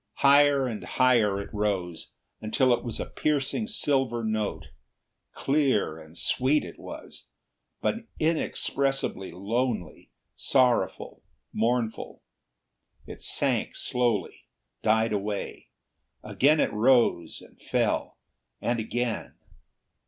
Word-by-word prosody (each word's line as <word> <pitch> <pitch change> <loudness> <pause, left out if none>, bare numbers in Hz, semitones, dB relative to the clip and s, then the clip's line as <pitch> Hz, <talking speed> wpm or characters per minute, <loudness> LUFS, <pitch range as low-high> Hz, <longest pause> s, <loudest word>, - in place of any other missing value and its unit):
Higher 140 -1 +6
and 115 -4 -4
higher 115 -6 +3
it 100 - -8
rose, 95 -5 -2 0.3
until 120 +4 +2
it 120 - -1
was 120 -3 -5
a - - -2
piercing 150 +9 -1
silver 135 - 0
note. 110 -7 -2 0.7
Clear 135 - +1
and 80 +1 -14
sweet 135 +4 +1
it - - -11
was, - - -10 0.5
but 225 0 -2
inexpressibly 135 - -1
lonely, 110 +3 -3 0.3
sorrowful, 125 -3 +1 0.3
mournful. 115 0 -1 0.8
It - - -10
sank - - 0
slowly, 120 -4 -1 0.3
died 110 0 +2
away. 105 0 -4 0.6
Again 150 +3 +3
it - - +1
rose 110 -7 +3
and - - -18
fell, - - -1 0.4
and 120 0 -1
again. 115 +1 -3
120 Hz, 100 wpm, -27 LUFS, 105-135 Hz, 0.8 s, Higher